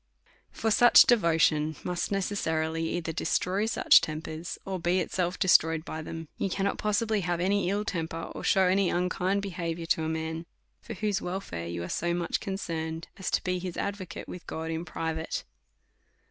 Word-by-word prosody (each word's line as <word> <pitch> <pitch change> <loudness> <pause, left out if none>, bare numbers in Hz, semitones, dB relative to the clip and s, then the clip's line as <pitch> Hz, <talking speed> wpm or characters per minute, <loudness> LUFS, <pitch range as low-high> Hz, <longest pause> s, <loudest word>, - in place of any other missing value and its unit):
For 225 - -1
such 240 +3 +8
devotion 160 -7 +3
must 180 +1 -2
necessarily 165 -5 -1
either 165 -1 -3
de - - -4
stroy 200 +4 +1
such - - +6
tempers, 160 +1 -5
or 190 -1 -3
be 175 +2 +2
itself 180 0 -1
destroyed 165 -4 +4
by 160 - -5
them. 165 +1 -7
You 195 - 0
cannot 195 +2 -1
possibly 215 0 +1
have 175 -1 -1
any 195 +1 +1
ill 205 +2 0
temper, 165 -2 -3
or - - -7
shew 190 - +4
any 190 +1 +3
unkind 180 +2 0
behaviour 170 -3 -3
to 165 -1 +1
a 160 - -1
man 160 +1 -3 0.3
for 230 - -7
whose 205 0 -1
welfare 175 - -4
you 85 0 -4
are - - -4
so 170 - -1
much 175 -1 -1
concerned, 165 -5 -4
as 190 - -2
to - - 0
be 180 0 -1
his 180 -1 -5
advocate 200 -4 -4
with 180 - -9
God 160 0 -4
in 165 +1 -3
private. 160 -1 -3
175 Hz, 175 wpm, -28 LUFS, 160-195 Hz, 0.3 s, such